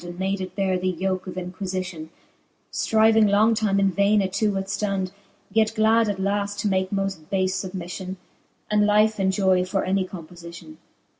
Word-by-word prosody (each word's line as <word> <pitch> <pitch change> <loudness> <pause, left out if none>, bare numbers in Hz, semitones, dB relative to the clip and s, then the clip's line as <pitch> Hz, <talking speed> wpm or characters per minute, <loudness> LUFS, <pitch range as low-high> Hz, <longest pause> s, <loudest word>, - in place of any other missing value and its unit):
And 175 0 -8
made 190 +1 -1
it 185 -1 -6
beare 190 -2 0
the 185 +1 0
yoke 185 +1 -2
of 180 - -6
inquiiitlon, 185 -3 -5 0.6
Stryving 220 -1 +4
long 215 +3 +4
time 210 -3 +1
in 195 -1 +3
vaine 200 +2 +3
it 190 -1 -3
to 210 +1 +1
withftond; 195 -1 -2 0.4
Yet 220 0 +2
glad 220 0 +3
at 200 -2 -3
laft 200 +1 -1
to 210 - 0
make 190 -1 0
moft 195 -5 -3
bafe 190 -1 +1 0.2
fubmiflion, 185 +1 -6 0.6
And 210 0 +3
life 210 +1 +3
enjoy 190 -1 +2
for 190 +1 -1
any 190 0 0
compofition. 175 - -11
195 Hz, 165 wpm, -24 LUFS, 185-205 Hz, 0.6 s, Stryving